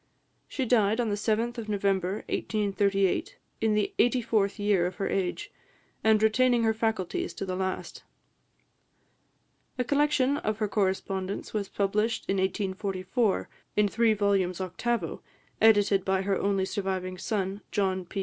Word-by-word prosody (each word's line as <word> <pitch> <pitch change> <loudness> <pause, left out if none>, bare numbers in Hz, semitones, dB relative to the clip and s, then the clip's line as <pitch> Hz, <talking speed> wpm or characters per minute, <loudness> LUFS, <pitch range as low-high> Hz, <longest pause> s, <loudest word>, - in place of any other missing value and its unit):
She 265 - -2
died 220 -2 +3
on 235 -2 +1
the - - 0
7th 230 +3 -1
of 220 -2 -6
November 195 -2 0
1838, 200 -2 0 0.2
in 220 -1 +2
the 210 -1 0
eighty 245 +1 +4
fourth 215 -4 0
year 205 -4 +2
of 180 - -6
her 195 - -2
age, 195 - -2 0.5
and 220 -1 +4
retaining 240 +2 +3
her 220 0 +3
faculties 220 -5 -2
to - - -4
the 185 -1 -3
last. 190 0 -4 1.8
A 250 - +1
collection 285 0 +2
of 215 -5 -2
her 215 -1 0
correspondence 190 -1 -2
was 205 -2 -2
published 210 +3 0
in 195 - 0
1844, 190 +2 -1 0.3
in 210 0 +4
three 225 +1 +2
volumes 195 -3 +1
octavo, 210 +6 -2 0.4
edited 205 -3 +5
by 190 0 +1
her 195 0 +1
only 195 0 +1
surviving 190 -2 -3
son, 195 0 -2
John 190 -2 0
P. 195 - -5
205 Hz, 145 wpm, -28 LUFS, 190-220 Hz, 1.8 s, edited